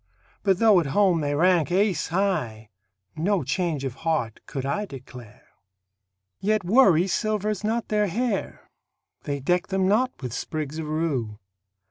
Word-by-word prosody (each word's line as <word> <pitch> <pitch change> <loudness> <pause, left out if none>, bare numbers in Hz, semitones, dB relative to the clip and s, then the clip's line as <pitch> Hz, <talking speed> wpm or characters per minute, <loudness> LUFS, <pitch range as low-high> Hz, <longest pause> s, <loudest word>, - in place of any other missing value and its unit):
But 195 -3 +2
though 215 -3 +5
at 165 - -1
home 185 -5 +4
they 145 0 -1
rank 175 +1 +3
ace 190 -3 +1
high, 155 - -2 0.4
No 185 +4 0
change 170 -7 -1
of 130 - -3
heart 160 -9 -1
could 135 -2 -4
I 205 +10 -2
declare. 125 - -12 0.9
Yet 215 +1 +1
worry 185 -4 +5
silvers 210 0 -1
not 225 +2 -1
their 210 -1 +2
hair; 220 +2 -3 0.5
They 140 -1 -2
deck 175 +6 0
them 190 -1 0
not 250 +6 +1
with 125 -3 -4
sprigs 155 +2 -4
of 155 - -4
rue. 145 -9 -2
175 Hz, 145 wpm, -25 LUFS, 145-205 Hz, 0.9 s, though